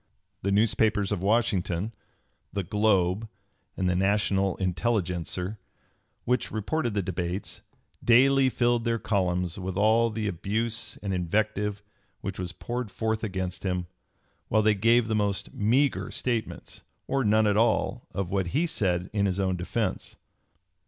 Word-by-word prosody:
The 100 - 0
newspapers 105 -1 +2
of 100 -4 -1
Washington 100 -2 +1 0.6
the 100 - -2
"Globe" 105 0 +1 0.5
and 95 - 0
the 90 - +2
"National 95 0 +2
Intelligencer" 90 0 -1 0.7
which 125 0 +1
reported 120 +2 -2
the 100 - +1
debates, 90 +1 -4 0.4
daily 135 +3 +5
filled 120 -1 +1
their 115 -1 +1
columns 90 -4 -1
with 95 0 -4
all 110 +3 +4
the 110 -1 -3
abuse 110 +5 -2
and 100 -1 -2
invective 100 +3 -1 0.4
which - - -5
was 90 -1 -3
poured 120 +3 -4
forth 110 +2 -2
against 95 -3 -3
him, 90 -2 -1 0.6
while 110 0 +2
they 110 0 +5
gave 115 +3 +3
the 110 - -1
most 100 -2 -1
meagre 130 +7 +1
statements, 120 -3 -3 0.2
or 135 -1 0
none 110 0 +4
at 105 -1 +3
all, 115 +2 +1
of 95 -3 -3
what 95 -2 0
he 165 - +3
said 90 - 0
in 100 -1 +2
his 95 0 -1
own 95 -1 +1
defence. 95 +3 -3
105 Hz, 140 wpm, -27 LUFS, 95-115 Hz, 0.7 s, daily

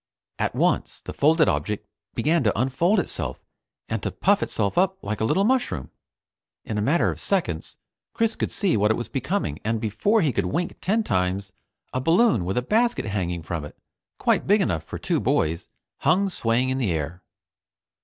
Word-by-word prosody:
At - - -1
once - - +1
the - - -7
folded 155 +2 +4
object 105 -1 -1 0.3
began 160 0 +2
to 105 -1 +2
unfold 165 - +2
itself - - -3 0.5
and - - -2
to - - -2
puff 200 +1 +2
itself 100 -3 -1
up 190 +1 +2
like 105 +1 -3
a - - +2
little 190 - +2
mushroom. 245 - 0 0.7
In 105 -1 -2
a - - 0
matter 145 +11 +2
of - - -8
seconds, 165 - -1 0.4
Chris 225 -1 0
could - - -2
see 195 -4 +1
what 105 0 +3
it 110 - +3
was 120 - -4
becoming, 135 - -2
and 115 +1 0
before 115 - +1
he 155 -5 +2
could 100 -3 0
wink 170 - -2
ten 220 +5 +1
times, 95 - -1 0.4
a 130 - -1
balloon 170 - +3
with 95 +5 -2
a 125 - +1
basket 235 - +1
hanging 90 -5 -2
from 80 -1 -4
it, 75 - -10 0.4
quite - - +1
big 205 +3 +5
enough 85 - 0
for - - -7
two - - 0
boys, 80 +2 0 0.3
hung 185 +7 +3
swaying 120 -2 +1
in 130 0 -1
the 120 -7 0
air. 80 +3 -3
125 Hz, 185 wpm, -24 LUFS, -, 0.7 s, big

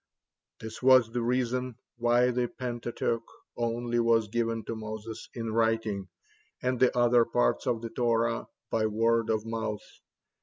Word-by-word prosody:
'" - - -62
This 110 0 -8
was 130 -3 +6
the 120 +1 -1
reason 125 +1 -1 0.2
why 120 +1 +3
the 125 0 0
Pentateuch 120 -1 -3 0.3
only 120 0 -1
was 115 -2 +3
given 115 -1 -1
to 115 - -4
Moses 110 0 -7
in 115 -2 -3
writing, 110 -4 0 0.5
and 125 -1 -1
the 130 -1 +3
other 120 0 +5
parts - - 0
of 115 -1 0
the 115 - -5
Torah 115 -1 0 0.2
by 110 -1 +2
word 115 +1 +1
of 110 -1 0
mouth. 110 -2 -3
115 Hz, 150 wpm, -29 LUFS, 110-120 Hz, 0.5 s, was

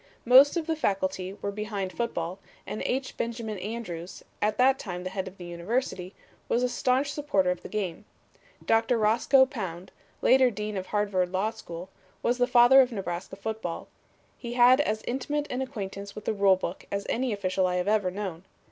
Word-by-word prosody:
"Most 265 +7 +7
of 330 - -1
the 320 - 0
Faculty 190 -7 -1
were 200 - -1
behind 200 -2 -4
football, 185 -6 -3 0.3
and 215 - -5
H. 260 +1 -2
Benjamin 230 -3 -3
Andrews, 185 -4 -6 0.2
at 210 0 +1
that 265 +1 +4
time 180 -2 -6
head 190 0 -3
of 190 +1 -10
the 175 - -9
University, 180 +2 -3 0.3
was 240 - +2
a 250 - +2
staunch 260 +3 +1
supporter 235 -12 +1
of 180 - -4
the - - -9
game. 205 -2 -3 0.6
Doctor 225 +2 +3
Roscoe 235 +5 +4
Pound, 190 - -6 0.3
later 260 -1 +6
dean 210 -1 -4
of 185 -1 -4
Harvard 200 -4 0
Law 195 +4 0
School, 170 -3 -9 0.4
was 245 +1 +1
the 245 - +3
father 245 +2 +7
of 255 -1 +1
Nebraska 190 -3 -5
football. 200 -4 -5 0.5
He 240 -1 -5
had 250 +3 +6
as 215 -5 -1
intimate 290 +4 -2
an 250 - -2
acquaintance 200 -6 -6
with 215 - -8
the - - 0
rule 200 -2 +4
book 185 -1 -6
as 200 0 -2
any 250 +1 0
official 190 -2 0
I 180 - -1
have 180 +1 -1
ever 210 -3 +2
known. 185 -3 -5
210 Hz, 185 wpm, -27 LUFS, 185-245 Hz, 0.6 s, Most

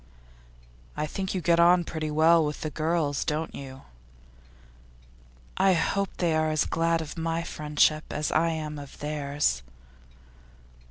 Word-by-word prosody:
'I - - 0
think 190 +5 -4
you 185 - -1
get 170 0 +3
on 175 +1 +5
pretty 155 -2 -4
well 160 +2 +4
with 150 0 -3
the 155 - -3
girls, 155 -3 0
don't 155 +2 -2
you?' 135 -1 -9 1.7
'I 190 0 +4
hope 195 +2 0
they 170 -3 +1
are 155 0 +1
as 155 -1 +1
glad 165 0 +1
of 160 +1 -7
my 165 +1 -1
friendship 155 -1 +1
as 150 0 -2
I 165 +1 +2
am 155 -2 -4
of 140 -2 -11
theirs. 145 - -1
155 Hz, 145 wpm, -27 LUFS, 150-170 Hz, 1.7 s, on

